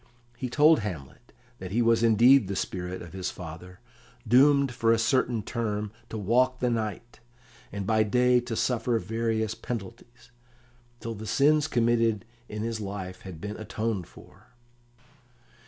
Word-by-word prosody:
He 125 +1 -4
told 150 +5 +5
Hamlet 95 - -7 0.3
that 95 - -6
he 115 +5 +1
was 115 0 +3
indeed 115 +1 +5
the 100 - -3
spirit 90 0 -4
of 85 - -12
his 95 -1 -3
father, 90 +2 -10 0.5
doomed 140 +3 +5
for 115 -2 +1
a 115 - +4
certain 120 -1 +1
term 105 -3 -3 0.2
to 110 - -5
walk 125 +5 +2
the 125 -1 +1
night, 115 +1 -4 0.5
and 100 -1 -4
by 110 0 +2
day 125 +3 +3
to 120 -1 -5
suffer 120 0 0
various 110 -1 -1
penalties, 120 +2 -8 0.7
till 115 - -4
the 110 0 -8
sins 150 +6 +3
committed 115 -4 +1 0.2
in 105 0 -4
his 115 -1 -3
life 95 -2 -6
had 90 -5 -9
been 105 +4 -6
atoned 110 -3 -3
for. - - -17
115 Hz, 150 wpm, -27 LUFS, 105-120 Hz, 0.7 s, told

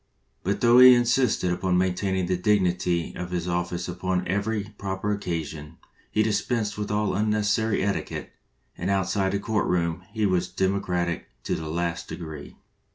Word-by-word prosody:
But 100 +3 -1
though 120 +1 +6
he 125 0 +10
insisted 120 -6 +2
upon 90 0 0
maintaining 95 0 0
the 90 - 0
dignity 90 -3 +1
of 90 0 -5
his 90 -1 -2
office 85 0 -2
upon 90 +1 -2
every 100 +3 -1 0.2
proper 95 +1 -2
occasion, 80 -6 -4 0.3
he 110 - +2
dispensed 105 0 0
with 105 0 -4
all 105 0 0
unnecessary 105 +1 +1
etiquelie, 100 0 -3 0.4
and 90 - -3
outside 95 0 +1
the 100 - 0
court 110 0 0
room 85 -1 0
he 110 0 0
was 90 -2 +1
democratic 90 -2 -1 0.2
to - - -2
the 80 -1 -4
last 85 +1 -2
degree. 80 -4 -8
95 Hz, 155 wpm, -25 LUFS, 90-105 Hz, 0.4 s, he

